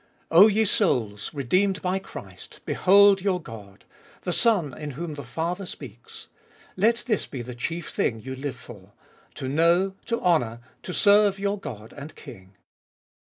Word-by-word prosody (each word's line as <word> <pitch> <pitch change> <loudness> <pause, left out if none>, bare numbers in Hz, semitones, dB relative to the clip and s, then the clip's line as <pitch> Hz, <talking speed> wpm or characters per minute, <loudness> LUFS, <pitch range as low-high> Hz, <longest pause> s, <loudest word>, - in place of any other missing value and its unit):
O 180 +6 +9
ye 220 +1 +2
souls, 115 - 0
redeemed 185 +8 +1
by 185 +1 0
Christ, - - -11
behold 200 +1 +5
your 185 -2 0
God! 105 - -12 0.4
the 180 - -2
Son 180 - +2
in 150 -1 -6
whom 170 -1 -4
the 145 -1 -7
Father 170 +9 -4
speaks. 120 -8 -9 0.5
Let 230 +5 +2
this 215 -5 0
be 130 -4 -6
the 125 +1 -8
chief 165 +7 -4
thing 115 - -1
you 130 +4 -7
live 135 0 -5
for 105 -5 -14 0.2
— - - -32
to 130 - -5
know, 170 +7 +2
to 230 0 -1
honour, 140 - +1 0.2
to - - -7
serve 205 +1 +4
your 200 +1 -2
God 115 - -9
and 145 +2 -10
King. 100 -9 -13
165 Hz, 160 wpm, -25 LUFS, 125-195 Hz, 0.5 s, O